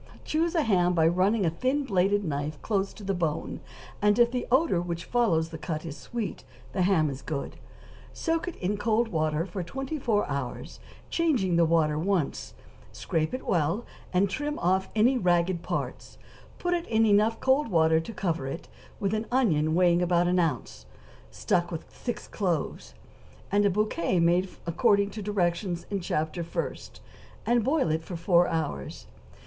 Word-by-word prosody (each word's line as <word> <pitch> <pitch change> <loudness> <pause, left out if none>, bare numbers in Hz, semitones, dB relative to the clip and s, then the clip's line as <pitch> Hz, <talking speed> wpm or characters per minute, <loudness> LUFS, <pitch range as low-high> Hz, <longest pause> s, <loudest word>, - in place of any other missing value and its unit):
= - - -21
Choose 330 +3 0
a 320 - +3
ham 180 -6 +2
by 160 -1 +4
running 190 +4 +2
a 165 - +2
thin 260 - 0
bladed 200 -3 +1
knife 145 0 -3
close 200 -2 0
to 210 - -12
the 195 0 -1
bone, 165 -4 -2 0.4
and 210 0 +4
if 235 -1 +5
the 250 -1 -2
odor 260 - +3
which 170 -1 -4
follows 170 -10 +1
the 160 -1 -8
cut 155 -1 -4
is 155 -3 -6
sweet 230 +4 -5 0.3
the 190 - 0
ham 180 -4 +3
is 135 -1 -5
good; 140 0 -5 0.5
soak 330 +1 -1
it 355 - -4
in 195 +3 -2
cold 225 +2 +1
water 155 -1 0
for 185 0 -5
twenty 270 - -4
four 220 -5 +1
hours, 140 -3 -5 0.3
changing 255 - +1
the 170 0 +5
water 155 -2 +2
once; 180 -3 -1 0.4
scrape 155 -1 -1
it 255 - -5
well, 170 +6 0 0.3
and 190 +2 +3
trim 295 +10 -3
off 190 +2 +1
any 245 +4 +4
ragged 175 -1 +2
parts; - - -4 0.4
put 355 0 -1
it 345 -1 -2
in 225 0 +3
enough 215 +2 +3
cold 265 +3 +2
water 160 -4 +3
to 165 - -6
cover 170 -9 -2
it, 135 +5 -6 0.3
with 200 -1 -1
an 220 +1 -2
onion 160 - +2
weighing 175 -1 +4
about 175 0 +2
one 180 +1 +2
ounce, 125 - -2 0.4
stuck 65 - 0
with 165 -1 -5
six 240 -3 -5
cloves, 160 - -2 0.6
and 205 +1 +3
a - - +5
bouquet 185 -3 0
made 175 +3 +3 0.2
according 200 +3 +2
to 215 - -6
directions 180 -3 -1
in 200 - 0
Chapter 160 -1 -2
first, 170 - -5 0.4
and 240 -1 +3
boil 270 - +1
it 160 +1 0
four 170 +1 +2
hours. 150 - -3
180 Hz, 175 wpm, -27 LUFS, 165-220 Hz, 0.6 s, if